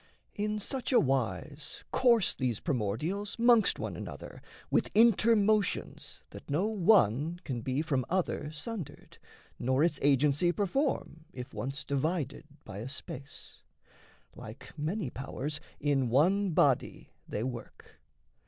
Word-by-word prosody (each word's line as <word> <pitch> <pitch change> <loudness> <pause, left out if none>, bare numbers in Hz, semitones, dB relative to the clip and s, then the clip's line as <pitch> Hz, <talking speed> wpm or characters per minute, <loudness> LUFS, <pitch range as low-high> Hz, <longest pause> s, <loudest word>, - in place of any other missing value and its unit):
In 210 +1 -1
such 255 +5 -3
a 250 - +6
wise 135 - -2
Course 235 -6 +4
these 125 -5 -1
primordials 150 - -2
'mongst 235 -2 +5
one - - -4
another - - -8 0.3
With - - +2
inter 230 0 +6
motions 210 -1 0
that - - -11
no 155 +8 +1
one 175 - +3
can 125 -7 -4
be 130 +5 -1
From 140 -5 0
other 175 -4 -1
sundered, 155 - -7 0.4
nor 130 +4 +2
its 165 -4 +1
agency 145 +4 +3
Perform, 205 - -1
if 125 -1 -8
once 135 +3 -4
divided 140 0 -2 0.2
by 100 -2 -7
a 120 +5 -5
space; 135 0 -10 0.7
Like - - -10
many 155 - -2
powers 140 +2 -4 0.2
in 135 -4 +1
one 185 - +3
body 140 -6 +1 0.2
they 105 - -3
work. 120 -2 -8
150 Hz, 125 wpm, -30 LUFS, 130-200 Hz, 0.7 s, a